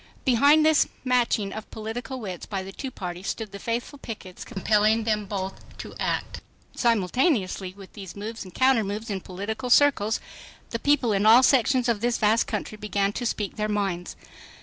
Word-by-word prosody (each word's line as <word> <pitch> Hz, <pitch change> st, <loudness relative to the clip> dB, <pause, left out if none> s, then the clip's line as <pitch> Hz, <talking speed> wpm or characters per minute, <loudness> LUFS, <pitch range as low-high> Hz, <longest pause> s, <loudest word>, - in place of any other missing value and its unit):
Behind 285 Hz, +5 st, +5 dB
this 315 Hz, -1 st, +4 dB, 0.2 s
matching 240 Hz, -5 st, +1 dB
of 220 Hz, -1 st, -7 dB
political 235 Hz, +4 st, -5 dB
wits 190 Hz, -6 st, -6 dB
by 195 Hz, -2 st, -3 dB
the 190 Hz, -, -8 dB
two 265 Hz, +7 st, -6 dB
parties 180 Hz, -4 st, -6 dB
stood 220 Hz, -2 st, -4 dB
the 200 Hz, -, -8 dB
faithful 235 Hz, +6 st, -3 dB
pickets 205 Hz, -7 st, -8 dB
compelling 215 Hz, +3 st, +2 dB
them 210 Hz, -2 st, 0 dB
both 190 Hz, -1 st, -6 dB
to -, -, -8 dB
act. -, -, -2 dB, 0.3 s
Simultaneously 210 Hz, -, +1 dB
with 195 Hz, -2 st, -13 dB
these 195 Hz, -4 st, -9 dB
moves 220 Hz, +3 st, -6 dB
and 185 Hz, -, -11 dB
counter 260 Hz, +1 st, +3 dB
moves 210 Hz, +3 st, -4 dB
in 195 Hz, -1 st, -3 dB
political 215 Hz, +7 st, -5 dB
circles, 235 Hz, -5 st, +4 dB, 0.5 s
the 230 Hz, -, -2 dB
people 275 Hz, -6 st, +2 dB
in 200 Hz, +2 st, +2 dB
all 235 Hz, +4 st, +8 dB
sections 260 Hz, -1 st, +3 dB
of 230 Hz, -3 st, +1 dB
this 240 Hz, 0 st, +1 dB
vast 220 Hz, +1 st, +3 dB
country 215 Hz, 0 st, -4 dB
began 205 Hz, -1 st, 0 dB
to 245 Hz, -, -2 dB
speak 210 Hz, -3 st, -3 dB
their 215 Hz, 0 st, -1 dB
minds. 195 Hz, -4 st, -2 dB
215 Hz, 175 wpm, -25 LUFS, 200-245 Hz, 0.5 s, all